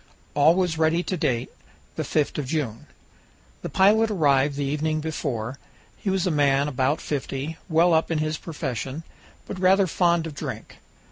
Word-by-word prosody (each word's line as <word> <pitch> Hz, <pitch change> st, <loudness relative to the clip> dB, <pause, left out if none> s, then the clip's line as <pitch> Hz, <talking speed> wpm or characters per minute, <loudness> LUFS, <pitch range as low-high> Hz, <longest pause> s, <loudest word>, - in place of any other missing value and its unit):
All 150 Hz, +3 st, +5 dB
was 180 Hz, -4 st, 0 dB
ready 160 Hz, +2 st, +2 dB
to 185 Hz, -, -2 dB
date, 125 Hz, -8 st, -1 dB, 0.4 s
the -, -, -2 dB
5th 150 Hz, -1 st, 0 dB
of 140 Hz, -, -3 dB
June. 130 Hz, -7 st, -3 dB, 0.7 s
The -, -, -5 dB
pilot 215 Hz, +4 st, +4 dB
arrived 145 Hz, -7 st, +2 dB
the 140 Hz, 0 st, -2 dB
evening 155 Hz, +2 st, -1 dB
before. 135 Hz, -6 st, -4 dB, 0.4 s
He 200 Hz, -, -4 dB
was 190 Hz, -1 st, +1 dB
a 180 Hz, -, +1 dB
man 140 Hz, -1 st, +2 dB
about 135 Hz, +2 st, 0 dB
fifty, 145 Hz, +2 st, -4 dB
well 170 Hz, +2 st, +4 dB
up 160 Hz, 0 st, +2 dB
in 165 Hz, -, 0 dB
his 155 Hz, 0 st, -1 dB
profession, 140 Hz, -2 st, -5 dB, 0.4 s
but 185 Hz, -, -6 dB
rather 190 Hz, +1 st, +4 dB
fond 170 Hz, -1 st, +2 dB
of 160 Hz, -, -6 dB
drink. -, -, -7 dB
155 Hz, 165 wpm, -24 LUFS, 140-170 Hz, 0.7 s, All